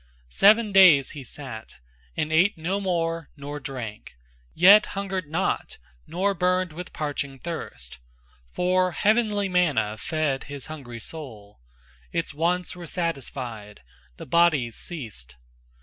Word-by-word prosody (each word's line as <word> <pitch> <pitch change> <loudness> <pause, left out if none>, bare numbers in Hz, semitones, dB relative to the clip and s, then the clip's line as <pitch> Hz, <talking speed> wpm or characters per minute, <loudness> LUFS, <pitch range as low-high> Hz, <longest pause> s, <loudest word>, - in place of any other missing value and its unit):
Seven 215 - +5
days 180 -8 +7
he 145 -3 -8
sat, 125 -4 -8 0.4
and 155 +1 -1
ate 185 +5 +4
no 185 +5 -2
more 165 -4 -1
nor 145 +1 -6
drank, 120 - -7 0.4
Yet 200 +5 +7
hungered 190 -4 -3
not, 170 +5 -2 0.3
nor 195 +3 0
burned 180 -1 0
with 175 +2 -8
parching 145 -2 -4
thirst, 65 - -7 0.5
For 185 0 +1
heavenly 210 -1 +2
manna 155 - +1
fed 155 -1 -1
his 140 -2 -6
hungry 135 -7 -8
soul 110 -6 -8 0.5
Its 165 -2 -2
wants 175 +4 0
were 175 -1 -9
satisfied, 130 - -5 0.3
the - - -8
body's 150 -7 +2
ceased. 105 - -6
160 Hz, 120 wpm, -25 LUFS, 135-180 Hz, 0.5 s, days